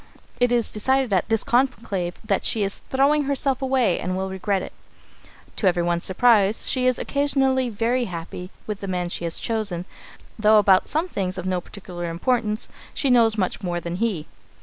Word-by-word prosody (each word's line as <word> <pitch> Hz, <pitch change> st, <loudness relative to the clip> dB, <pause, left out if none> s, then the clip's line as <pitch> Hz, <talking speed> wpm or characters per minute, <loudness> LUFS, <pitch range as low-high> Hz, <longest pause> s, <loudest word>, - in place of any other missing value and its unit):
It 245 Hz, 0 st, +3 dB
is 240 Hz, -2 st, +1 dB
decided 260 Hz, +2 st, +1 dB
at 185 Hz, -, +1 dB
this 225 Hz, -1 st, +1 dB
conclave 220 Hz, -8 st, 0 dB
that 200 Hz, -3 st, 0 dB
"she 220 Hz, -, +1 dB
is 195 Hz, 0 st, -2 dB
throwing 280 Hz, +2 st, +3 dB
herself 275 Hz, -1 st, 0 dB
away 260 Hz, -8 st, +1 dB
and 185 Hz, 0 st, -2 dB
will 190 Hz, 0 st, -3 dB
regret 190 Hz, 0 st, -1 dB
it." -, -, -9 dB, 0.8 s
To 200 Hz, -, +1 dB
everyone's 175 Hz, -1 st, +1 dB
surprise, 210 Hz, 0 st, +3 dB
she 255 Hz, -1 st, +1 dB
is 255 Hz, -, +2 dB
occasionally 270 Hz, -3 st, +1 dB
very 235 Hz, +3 st, 0 dB
happy 180 Hz, 0 st, -7 dB, 0.2 s
with 210 Hz, -2 st, -4 dB
the 200 Hz, -, -6 dB
man 180 Hz, -2 st, -2 dB
she 170 Hz, -, -3 dB
has 165 Hz, -, -1 dB
chosen, 210 Hz, -6 st, -2 dB, 0.5 s
though 215 Hz, 0 st, +5 dB
about 195 Hz, -3 st, +4 dB
some 320 Hz, +4 st, -1 dB
things 185 Hz, -, -3 dB
of 185 Hz, -, -5 dB
no 185 Hz, -1 st, -1 dB
particular 175 Hz, -3 st, -7 dB
importance 215 Hz, +4 st, -1 dB, 0.3 s
she 280 Hz, -4 st, +1 dB
knows 225 Hz, -3 st, +5 dB
much 190 Hz, 0 st, -1 dB
more 175 Hz, -3 st, -2 dB
than 170 Hz, 0 st, -5 dB
he. 200 Hz, -8 st, -1 dB
210 Hz, 180 wpm, -23 LUFS, 185-250 Hz, 0.8 s, though